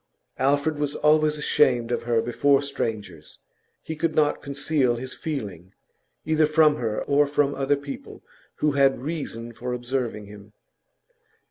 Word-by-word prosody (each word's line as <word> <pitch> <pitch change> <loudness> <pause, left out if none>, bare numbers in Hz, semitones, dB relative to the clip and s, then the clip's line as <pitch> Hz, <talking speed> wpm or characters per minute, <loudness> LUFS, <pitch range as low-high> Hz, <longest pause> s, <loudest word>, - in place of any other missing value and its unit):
Alfred 145 +3 +1
was 145 -1 -1
always 150 0 +3
ashamed 120 -5 +2
of - - 0
her 115 -1 +1
before 140 +4 +2
strangers; 105 - -5 0.5
he 160 - -5
could 155 0 -1
not 150 -1 +2
conceal 140 -2 0
his 130 +2 -6
feeling, 100 - -6 0.5
either 155 -1 +3
from 155 -1 +4
her 110 -5 -2
or 145 +1 +3
from 145 0 +1
other 135 +1 +1
people 140 0 -9 0.3
who 150 - +1
had 140 -2 +3
reason 125 -7 -5
for 125 +2 -5
observing 120 -3 -3
him. 105 +1 -13
140 Hz, 140 wpm, -24 LUFS, 120-150 Hz, 0.5 s, from